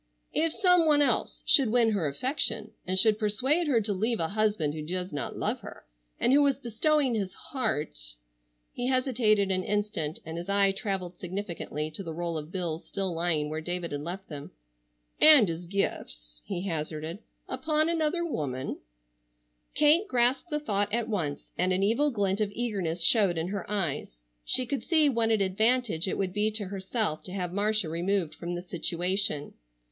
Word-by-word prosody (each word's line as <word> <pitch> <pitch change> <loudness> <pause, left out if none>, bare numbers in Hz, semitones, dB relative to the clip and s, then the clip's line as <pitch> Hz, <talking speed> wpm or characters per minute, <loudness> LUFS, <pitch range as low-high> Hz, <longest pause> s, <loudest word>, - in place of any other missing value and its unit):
"If 330 0 +2
some 360 -4 +4
one 295 -1 +5
else - - 0
should 270 -6 +5
win 230 -1 +3
her 190 -7 0
affection, 255 - -1 0.2
and 185 +1 0
should 215 +2 +5
persuade 260 +10 +1
her 255 -6 +3
to 205 0 -1
leave 220 +4 0
a 160 - 0
husband 205 -8 0
who 155 - -5
did 180 +4 -4
not 145 - -4
love - - -1
her, - - -11 0.3
and 255 - +3
who 290 - +6
was 280 -3 +3
bestowing 270 +3 +1
his 195 -4 -3
heart"—he - - -5
hesitated 235 -6 +2
an 185 0 0
instant 205 -7 -2
and 160 +1 -5
his 175 - -7
eye 200 0 +4
traveled 195 -2 -4
significantly 175 -5 -4
to 155 - -5
the 165 -4 -6
roll 170 0 -3
of 155 +1 -5
bills 175 -3 -3
still 195 -2 -2
lying 165 -3 0
where 155 +1 -4
David 175 +1 -3
had 145 0 -3
left 180 +5 -6
them—"and - - +2
his 170 +1 -5
gifts," - - -3
he 175 - -4
hazarded, 160 0 -4 0.3
"upon 305 +4 +1
another 335 +1 0
woman——" 135 - -3 1.0
Kate 310 +7 +4
grasped 250 +5 +1
the 300 -1 -1
thought 205 -7 -1
at 235 +1 -1
once 160 -9 -3
and 185 +1 +2
an 185 +1 +1
evil 235 +9 +2
glint 200 -4 -1
of 205 -1 0
eagerness 190 -8 -1
showed 195 -2 +4
in 165 +2 -2
her 200 -2 -5
eyes. 165 - -2 0.3
She 255 - +4
could 270 +3 -3
see 315 -4 +3
what 230 -3 +1
an 220 -2 +2
advantage 210 -1 +1
it - - -2
would 190 -2 -2
be 210 +2 +1
to 215 -1 0
herself 195 -3 -2
to 185 - -6
have 180 -2 -3
Marcia 210 -1 +1
removed 170 +1 -1
from 175 +1 -5
the 175 - -5
situation. 175 -2 -1
195 Hz, 175 wpm, -28 LUFS, 165-235 Hz, 1.0 s, who